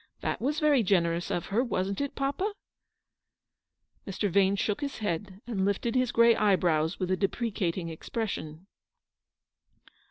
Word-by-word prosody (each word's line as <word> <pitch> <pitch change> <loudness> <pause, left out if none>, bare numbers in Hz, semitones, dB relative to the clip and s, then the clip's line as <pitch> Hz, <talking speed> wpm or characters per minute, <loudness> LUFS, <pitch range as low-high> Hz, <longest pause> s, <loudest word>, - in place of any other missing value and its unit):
That - - -2
was 290 +5 0
very 295 -4 +4
generous 175 -4 +1
of 175 - -2
her, 235 +4 +3
wasn't 195 -4 -2
it, 280 - -3
papa? 285 +10 -1 0.8
" - - -45
Mr. 195 0 -1
Vane 195 +1 +4
shook 205 +5 -1
his 280 -1 -3
head, 195 -1 -3
and 215 -6 -2
lifted 200 +4 0
his 255 -2 +1
grey 235 0 +5
eyebrows 175 -5 +2
with 185 -1 -1
a - - +4
deprecating 190 -4 -1
expression. 165 -2 -5
200 Hz, 145 wpm, -28 LUFS, 180-235 Hz, 0.8 s, grey